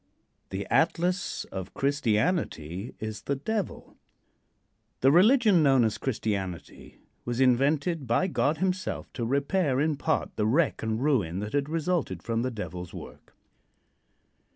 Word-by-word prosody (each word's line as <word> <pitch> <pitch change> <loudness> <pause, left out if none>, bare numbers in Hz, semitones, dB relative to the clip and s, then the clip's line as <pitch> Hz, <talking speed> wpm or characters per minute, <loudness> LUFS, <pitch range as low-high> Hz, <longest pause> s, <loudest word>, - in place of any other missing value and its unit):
II. 95 - -3
THE - - -13
ATLAS 175 +3 +1
OF 95 -2 -6
CHRISTIANITY 115 - -1
IS 110 -2 -5
THE 140 - -2
DEVIL. 205 +8 -4 1.0
The 135 - +5
religion 210 - +5
known 135 -4 +5
as 110 -1 0
"Christianity" 100 -8 -4 0.3
was 120 0 -3
invented 140 +4 +2
by 115 +10 +2
God 160 -4 +1
himself 190 0 -2
to 120 - -4
repair 140 +1 +1
in 150 0 +1
part - - -1
the 105 - +1
wreck 145 +6 +2
and 110 +2 -2
ruin 105 - +1
that 105 +1 -5
had 145 0 0
resulted 160 - -1
from 115 0 -1
the 130 - -1
Devil's 90 -6 -7
work. - - -11
135 Hz, 135 wpm, -27 LUFS, 110-165 Hz, 1.0 s, The